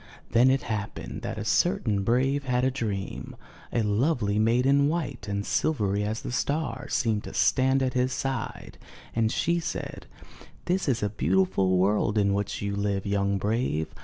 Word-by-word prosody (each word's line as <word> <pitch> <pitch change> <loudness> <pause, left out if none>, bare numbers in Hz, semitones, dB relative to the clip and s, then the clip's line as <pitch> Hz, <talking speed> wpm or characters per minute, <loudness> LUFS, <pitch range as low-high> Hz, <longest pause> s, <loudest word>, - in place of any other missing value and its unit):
Then 120 +3 +5
it 135 +1 +2
happened 110 -3 -4
that - - -4
a - - -4
certain 100 -2 +1
brave 135 +6 +1
had 125 0 +1
a 130 - +2
dream. 105 -7 -4 0.4
A 115 - +1
lovely 105 -1 +1
maiden, 125 +6 +3
white 145 -8 -3
and 100 0 -2
silvery 105 -9 0
as 110 +2 -3
the - - -4
star, 150 +5 -2
seemed 110 -4 0
to - - -8
stand 130 +1 +3
at 130 -1 0
his 125 0 +1
side 135 -3 -4 0.4
and 110 -1 +2
she 170 +1 +1
said: 165 - -5 0.6
'This 180 0 0
is 120 -4 0
a 105 - +1
beautiful 100 - +2
world 105 +3 +2
in 100 -1 +3
which 100 0 -2
you 100 0 -2
live, 100 -1 -1
young 100 0 +1
brave. 105 -6 -1
115 Hz, 165 wpm, -27 LUFS, 100-130 Hz, 0.6 s, Then